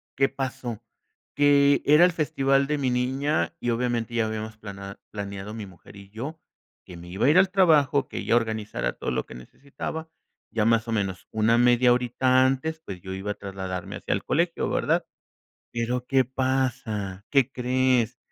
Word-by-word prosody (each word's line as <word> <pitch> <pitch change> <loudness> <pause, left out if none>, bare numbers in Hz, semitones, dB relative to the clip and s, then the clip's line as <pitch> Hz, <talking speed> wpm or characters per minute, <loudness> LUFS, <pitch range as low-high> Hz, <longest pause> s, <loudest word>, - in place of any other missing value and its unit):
¿qué 135 0 +3
pasó? 125 -4 -5 0.5
Que 140 -1 +5
era 150 +4 +6
el 180 - +3
festival 135 -3 +1
de 150 0 0
mi 130 -3 0
niña 135 +5 0
y, 120 - -1
obviamente, 120 -1 -1
ya 115 -2 +1
habíamos 110 0 -5
plana 100 -2 -9
planeado 100 +1 -6
mi 110 -2 -6
mujer 95 +1 -16
y 100 0 -13
yo 140 +9 -6 0.5
que 90 - -11
me 85 +1 -11
iba 95 +7 -1
a - - +5
ir 180 - +6
al 190 0 +4
trabajo, 155 -7 +3
que - - -6
ella - - +1
organizara 110 - -1
todo - - -5
lo 60 - -1
que - - -12
necesitaba. 140 - -7 0.4
Ya 110 -2 0
más 115 0 +2
o - - -3
menos 95 -4 -2
una 110 +2 +3
media 120 0 +5
horita 130 +1 +3
antes, 160 +5 -1
pues, 90 -3 -7
yo 95 0 -6
iba 100 +2 -3
a - - -1
trasladarme 95 -3 -6
hacia - - -2
el - - -2
colegio, 170 +1 0
¿verdad? - - +1 0.7
Pero, 120 +1 -2
¿qué 135 -1 +3
pasa? 125 -6 -2
¿Qué 135 -2 +3
crees? 125 -1 +1
120 Hz, 180 wpm, -25 LUFS, 105-135 Hz, 0.7 s, era